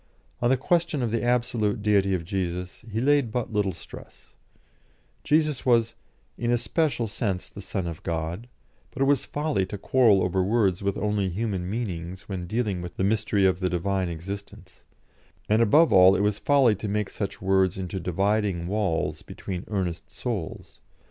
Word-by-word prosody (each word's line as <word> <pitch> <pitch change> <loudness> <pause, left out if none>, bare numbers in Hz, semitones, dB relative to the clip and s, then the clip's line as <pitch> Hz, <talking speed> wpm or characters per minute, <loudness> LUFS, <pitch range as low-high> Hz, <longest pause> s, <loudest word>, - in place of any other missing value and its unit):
On 120 - +3
the 130 - +4
question 165 -1 +1
of 115 - -1
the 115 - 0
absolute 120 -4 0
Deity 100 -2 +3
of 85 - -3
Jesus 90 0 -4
he 110 - -1
laid 140 -2 +2
but 120 -1 -3
little 105 -2 +1
stress; 80 - -13 0.9
Jesus 150 -3 +1
was 115 -3 +3 0.5
"in 120 - -1
a 120 - +3
special 140 -2 0
sense 100 -3 -2
the 100 - -10
Son 95 -1 -3
of 85 -2 -6
God," 85 +7 -3 0.4
but 135 - -2
it - - +3
was 140 -2 +2
folly 145 -8 0
to 100 - -6
quarrel 110 -2 +4
over 95 +1 +1
words 100 -3 +1
with 100 0 -1
only 105 -2 0
human 95 -2 -2
meanings 95 -5 -4
when 90 -3 -5
dealing 105 -3 -1
with 85 -1 -8
the - - 0
mystery 105 -1 +2
of 95 -1 +2
the 90 -1 0
Divine 95 +1 -1
existence, 95 +5 -8 0.6
and, 110 +2 +3
above 150 +9 +5
all, 95 +1 +7
it - - +1
was 105 0 +1
folly 140 -5 +4
to 105 - -5
make 105 0 -1
such 100 - -4
words 95 -1 +2
into 95 0 -4
dividing 95 0 0
walls 100 -3 -1
between 90 -2 -6
earnest 90 -5 -3
souls. 110 -10 -5
100 Hz, 175 wpm, -26 LUFS, 95-115 Hz, 0.9 s, all